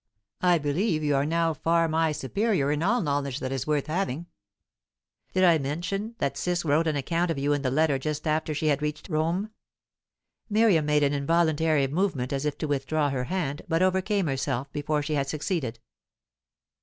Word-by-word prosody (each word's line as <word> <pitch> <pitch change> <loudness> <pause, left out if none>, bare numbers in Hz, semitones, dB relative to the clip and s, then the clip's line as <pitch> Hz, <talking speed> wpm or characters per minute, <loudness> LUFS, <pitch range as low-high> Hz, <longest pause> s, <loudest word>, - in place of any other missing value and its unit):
I 180 -1 +4
believe 155 +3 0
you 145 -1 +2
are 140 +1 +1
now 165 0 +1
far 165 +2 +2
my 160 0 +1
superior 150 - 0
in 150 +1 -1
all 235 +8 +2
knowledge 140 -2 -1
that 130 - -4
is 135 0 -3
worth 150 -2 +1
having. 165 -2 -2 1.1
Did 185 - +2
I 170 -3 +5
mention 175 +10 -3
that 140 -5 -1
Ciss 175 -1 -1
wrote 155 +2 +2
an 155 - +1
account 165 +5 0
of 165 - -1
you 145 +1 +1
in 145 - -1
the 135 - 0
letter 145 0 +2
just 150 +3 -3
after 155 0 0
she 155 - -2
had 145 -2 +2
reached 150 +4 -4
Rome?" 170 +6 -1 1.0
Miriam 205 -8 +3
made 150 0 +3
an 140 0 +2
involuntary 160 0 +2
movement 140 -4 -1
as 135 +1 -2
if 150 - -1
to 155 - -3
withdraw 145 +1 0
her 125 -2 -2
hand, 155 -4 -2
but 165 +2 +2
overcame 190 +1 +1
herself 135 -1 -2
before 150 0 -1
she 155 +1 -2
had 140 -2 0
succeeded. 150 - -2
155 Hz, 185 wpm, -26 LUFS, 140-170 Hz, 1.1 s, I